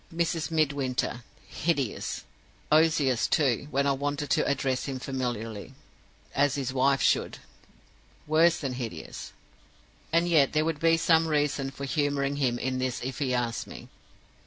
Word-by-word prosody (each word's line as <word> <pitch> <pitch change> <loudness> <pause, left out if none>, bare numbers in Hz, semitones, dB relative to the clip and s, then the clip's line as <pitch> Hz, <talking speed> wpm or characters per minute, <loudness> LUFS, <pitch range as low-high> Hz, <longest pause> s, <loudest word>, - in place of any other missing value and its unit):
Mrs. 165 -1 -1
Midwinter. 140 -6 0 0.2
Hideous! 145 -9 -2 0.5
Ozias, 155 -5 +3
too, 140 -2 +1
when 140 0 +1
I 140 - +3
wanted 145 +1 -2
to - - +2
address 135 -2 0
him 135 -2 -3
familiarly, 120 -5 -4 0.6
as 145 0 +2
his 130 -3 -3
wife 135 +1 +2
should. - - +2 0.9
Worse 165 +3 +4
than 135 -6 -3
hideous! 120 -3 -6 0.8
"And 170 +1 +3
yet 155 -6 +4
there 155 0 +2
would 160 -2 -1
be 165 0 +4
some 165 0 +3
reason 145 -3 0
for 140 +1 -7
humoring 140 -1 0
him 125 -4 +1
in 130 +1 -2
this 130 -1 -1
if 130 0 -4
he 135 -3 0
asked 120 -2 -1
me. - - -10
140 Hz, 145 wpm, -28 LUFS, 130-155 Hz, 0.9 s, Worse